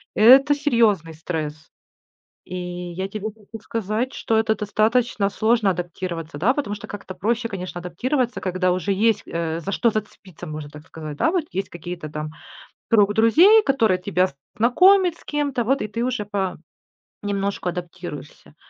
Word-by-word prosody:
это 265 +7 +7
серьезный 225 - +2
стресс. 155 -1 -5 0.7
И 185 - -7 0.4
я 190 +3 -3
тебе 215 +1 -5
хочу 215 +1 -12
сказать, 225 +3 -2
что 225 - -1
это 220 -1 +1
достаточно 215 0 +1
сложно- 220 -1 +2
адаптироваться, 170 -3 -4
да. 235 - +3
Потому 255 -8 -2
что 205 - -9
как-то 195 -2 -8
проще, 230 +4 -1
конечно, 185 -4 -6
адаптироваться, 245 - -2
когда 185 -1 0
уже 185 +2 -1
есть, 210 +1 +2
э, 165 -1 -2
за 190 +4 -4
что 230 +3 +2
зацепиться, 190 -5 -6
можно 155 -1 -6
так 150 0 -11
сказать, 155 -2 -7
да - - +2
вот. 360 -3 +1
Есть 195 +1 -3
какие-то 175 -2 -7
там, 150 0 -5 0.6
круг 205 -2 +5
друзей, 340 - +6
которые 225 -9 +2
тебя 180 -1 +1 0.2
знакомят 360 - +5
с - - -20
кем-то, 285 -5 -1
вот 270 +4 +1
и 210 - -3
ты 230 +3 -3
уже 250 -4 -1 0.8
по-немножку 200 -2 -4
адаптируешься. 175 -6 -8
205 Hz, 155 wpm, -22 LUFS, 175-235 Hz, 0.8 s, это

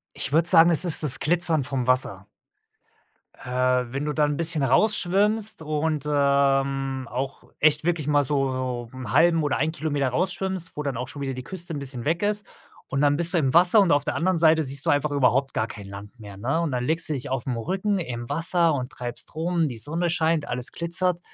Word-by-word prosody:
Ich - - -4
würde 165 +2 +3
sagen, 170 -1 +6
es 170 +2 +7
ist 165 -2 +3
das 145 -4 +2
Glitzern 165 -2 +1
vom 130 -2 -3
Wasser. 100 -7 0 1.1
Äh, 125 0 0
wenn 140 +2 -3
du 150 - -2
da 150 0 +2
'n 145 -1 -2
bisschen 165 -3 0
rausschwimmst 210 - +1
und, 155 -1 -2
ähm, 135 -2 +1
auch 130 +2 -5 0.2
echt 150 0 +3
wirklich 165 -3 -1
mal 145 -1 +3
so 130 -3 -2
so 130 - -12
'n 130 - -6
1/2 165 -1 +4
oder 145 - 0
1 155 +3 0
Kilometer 145 -4 -1
rausschwimmst, 185 +3 -2
wo 150 - -4
dann 140 -4 -3
auch 125 +1 -4
schon 140 - -9
wieder 135 -1 -3
die 130 0 -7
Küste 175 +2 -6
'n 145 - -4
bisschen 130 -4 -6
weg 165 +5 0
ist. 210 0 -1 0.4
Und 135 - -1
dann 145 0 +3
bist 170 +2 -1
du - - +2
im 135 -5 +1
Wasser 180 +5 +6
und 185 -4 +2
auf 145 0 +2
der - - -2
anderen 185 +2 +1
Seite 160 -1 +4
siehst 135 0 -3
du - - +1
einfach 145 +1 +1
überhaupt 135 -1 +1
gar 110 - -1
kein 105 -3 -10
Land 100 +4 -11
mehr, 100 -3 -11
ne? 135 +11 -1
Und 165 -3 -2
dann 125 -1 -2
legst 160 +4 -1
du - - 0
dich 135 -3 -5
aufm 130 -1 -3
Rücken 190 - -1
im 120 -7 -5
Wasser 165 +2 +1
und 130 -3 -4
treibst 120 +3 -6
rum, 165 0 0
die 125 -5 -6
Sonne 165 +9 -2
scheint, 160 -3 0
alles 125 0 -3
glitzert. 170 +1 -2
145 Hz, 220 wpm, -24 LUFS, 130-170 Hz, 1.1 s, es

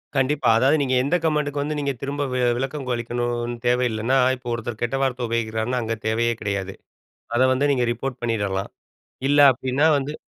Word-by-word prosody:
கண்டிப்பா. 135 +2 +2
அதாவது 135 +6 +4
நீங்க 130 -2 +1
எந்த 145 +6 +1
கமெண்டுக்கு 150 -2 0
வந்து 150 +1 -2
நீங்க 140 -1 -1
திரும்ப 145 +1 -2 0.3
விளக்கம் 135 +1 -4
அளிக்கணும்னு 120 0 -2
தேவ 125 +1 +3
இல்லன்னா, 115 +5 +1 0.2
இப்போ 125 -1 -8
ஒருத்தர் 115 -1 -5
கெட்ட 120 +3 -1
வார்த்தை 125 -2 -1
உபயோகிக்கிறார்னா, 115 +2 -1
அங்க 115 0 -2
தேவையே 115 +1 +1
கிடையாது. 100 -2 -3 0.6
அதை 130 +2 +4
வந்து 145 +3 +1
நீங்க 125 -2 +1
ரிப்போர்ட் 125 +2 -4
பண்ணிடலாம். 100 -4 -2 0.6
இல்ல 145 0 +5
அப்படின்னா 130 +5 +1
வந்து 145 +2 -5
125 Hz, 165 wpm, -23 LUFS, 115-140 Hz, 0.6 s, இல்ல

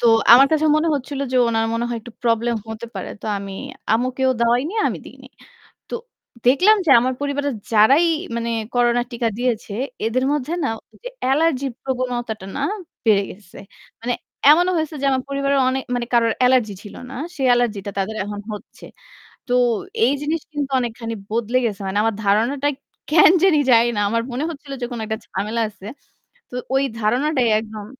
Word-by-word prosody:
তো 240 - +2 0.3
আমার 270 +3 +9
কাছে 315 0 +2
মনে 325 +2 +1
হচ্ছিল 280 0 -4
যে - - +2
উনার 225 -1 +1
মনে 235 - -1
হয় 235 -1 -3
একটু 230 +1 -12
প্রবলেম 235 0 +1
হতে 220 +1 -6
পারে। - - -5
তো - - -6
আমি 195 0 -7 0.4
আম্মুকেও 255 +3 +1
দেওয়াই 240 +2 +3
নি, 425 - -8
আমি - - -4
দিইনি। - - -13 0.6
তো - - -5 0.5
দেখলাম 370 +12 +6
যে 290 - +3
আমার 255 +2 0
পরিবারের 285 -1 -1 0.2
যারাই 270 +11 +5 0.3
মানে 235 0 -2 0.2
করোনা 240 0 +3
টিকা 235 -1 -1
দিয়েছে, 240 -4 -2 0.3
এদের 255 +3 0
মধ্যে 295 +1 -2
না - - +1 0.2
ওই - - -20
যে - - -3
অ্যালার্জি 275 0 +2 0.2
প্রবণতাটা 245 -5 -3
না 285 - -2 0.4
বেড়ে 205 -3 +4
গেছে। 185 -2 -13 0.4
মানে 245 +1 -1 0.4
এমনও 350 +4 +5
হয়েছে 315 -1 -2
যে - - +2
আমার 260 -1 0
পরিবারের 275 0 0
অনে 265 +1 0
মানে 240 -1 -2
কারোর 230 -1 +3
অ্যালার্জি 250 -5 +3
ছিল 205 - -11 0.2
না। - - -8 0.2
সে 280 - -5
অ্যালার্জি 240 -4 +2
টা - - -2
তাদের 205 +3 -2
এখন 205 0 -5
হচ্ছে। 210 - -10 0.6
তো - - -1 0.5
এই 255 - +3
জিনিস 315 +2 -1
কিন্তু 290 -2 -3
অনেকখানি 230 -1 -4 0.2
বদলে 235 +2 +1
গেছে। 205 -2 -4
মানে 190 +2 -1
আমার 225 -1 +1
ধারণাটা 240 +8 +2 0.4
কেন 315 +2 +7
জানি 370 -5 +5
যানি 235 0 +5
না - - +1
আমার 230 +2 0
মনে 265 +5 -2
হচ্ছিল 285 -2 -9
যে - - 0
কোন 240 - -4
একটা 220 0 -3
ঝামেলা 210 +4 -3
আছে। 205 -1 -13 0.6
তো - - -11 0.2
ওই 270 +1 +3 0.2
ধারণাটাই 250 +4 +1
একদম 215 -1 -7
245 Hz, 180 wpm, -21 LUFS, 225-275 Hz, 0.6 s, আমার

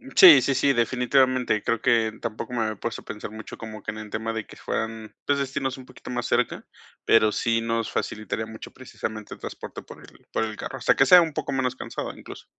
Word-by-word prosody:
Sí, 370 -3 +10
sí, 135 - +2
sí, 140 +1 +3
definitivamente, 125 -1 +2
creo 115 -1 0
que 115 -3 +3
tampoco 115 +2 -5
me 120 - -1
había 110 -1 -1
puesto 115 +3 -5
a - - -23
pensar 105 -1 -7
mucho 110 0 -9
como 110 -1 -8
que - - -6
en 110 - -4
el 110 -1 -8
tema 110 +1 -2
de 110 -2 -4
que - - -14
fueran, 110 -1 -4
pues, 145 -1 +2
destinos 135 -1 -2
un 130 - -12
poquito - - -10
más 120 -1 -2
cerca, 120 0 0 0.4
pero 110 -1 +5
sí 115 +1 +1
nos 115 -1 -1
facilitaría 110 +1 -3
mucho 110 0 -10
precisamente 110 -4 -7
el - - -12
transporte - - -7
por - - -13
el - - -18
por - - 0
el 110 -1 -6
carro, 135 - -6
hasta 130 - +3
que 135 - +4
sea 180 +4 +9
un 160 -2 -4
poco 150 -1 -3
menos 130 -1 0
cansado - - -5
incluso. - - -11
115 Hz, 230 wpm, -25 LUFS, 110-130 Hz, 0.4 s, Sí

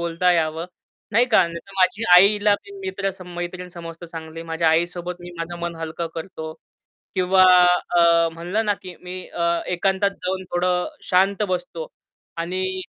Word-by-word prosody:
बोलता 170 +1 +2
यावं. 160 0 0 0.5
नाही 230 +4 +5
का. 225 - +5
नाहीतर 170 +3 -9
माझी 195 +4 +2
आईला 205 +2 +5
मी 400 - -14 0.2
मित्र 200 - -2
सम 180 -1 -10
मैत्रीण 180 +1 -5
समजतो 170 -1 -9
चांगली. 165 0 -8
माझ्या 165 0 0
आईसोबत 175 +2 0
मी 175 - -9
माझं 170 +1 -5
मन 170 0 -3
हलकं 165 +1 -4
करतो. 160 -1 -6 0.6
किंवा 185 0 +4 0.6
अ, 170 -1 +5
म्हणलं 175 +7 -2
ना, 205 - +3
की 185 -1 -9
मी 185 +1 -7
अ, 170 0 0
एकांतात 190 +3 +1
जाऊन 185 +1 -2
थोडं 180 0 +1
शांत 195 +3 +2
बसतो 265 - -3 0.5
आणि 185 +2 -2
180 Hz, 155 wpm, -22 LUFS, 170-190 Hz, 0.6 s, नाही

